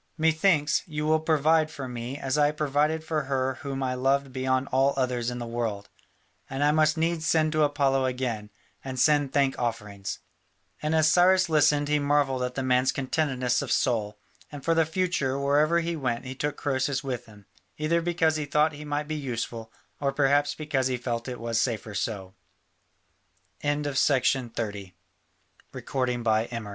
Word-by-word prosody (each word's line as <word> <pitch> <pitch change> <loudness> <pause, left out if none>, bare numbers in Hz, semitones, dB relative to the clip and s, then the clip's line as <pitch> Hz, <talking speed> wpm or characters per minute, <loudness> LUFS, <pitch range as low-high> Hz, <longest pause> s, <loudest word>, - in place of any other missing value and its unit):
Methinks, 160 -1 +2
you 150 -2 -3
will 155 +1 +3
provide 155 0 +2
for 140 -4 -7
me 125 +2 -5
as 135 -1 -2
I 145 -1 +4
provided 150 +1 0
for 155 -2 -2
her 130 -1 -1
whom 135 -1 -4
I 130 -1 -1
loved 135 +1 0
beyond 130 +1 0
all 135 +1 +3
others 125 -2 0
in 125 - -5
the 120 - -5
world, 115 -4 -3 0.6
and 135 +2 -2
I 145 - +4
must 155 0 +3
needs 165 0 0
send 155 -1 +2
to 155 0 +1
Apollo 140 -2 +2
again, 125 -5 -3 0.3
and 130 -1 -5
send 145 -1 +3
thank 140 -1 +1
offerings." 105 -5 -4 0.6
And 155 +1 0
as 155 -1 +4
Cyrus 185 0 +4
listened 150 -2 +3
he 150 0 +2
marvelled 140 -2 +1
at 125 0 -3
the 135 - -2
man's 130 0 +3
contentedness 130 -3 0
of - - -4
soul, 110 -4 0 0.3
and 145 -2 -9
for 165 - +3
the 165 -1 +2
future 160 -6 0
wherever 150 +4 +2
he 170 0 -2
went 125 -5 -2
he 130 - -5
took 145 +2 -3
Croesus 135 +1 -1
with 125 -3 -4
him, 105 -2 -16 0.3
either 165 +3 +1
because 165 -2 +1
he 150 - -2
thought 150 +2 +2
he 145 +1 -9
might 150 0 -3
be 155 - -3
useful 120 -5 -4 0.3
or 140 -1 0
perhaps 145 +1 +2
because 145 -4 -1
he 130 -1 -1
fe 120 -1 -2
140 Hz, 155 wpm, -26 LUFS, 130-155 Hz, 0.6 s, I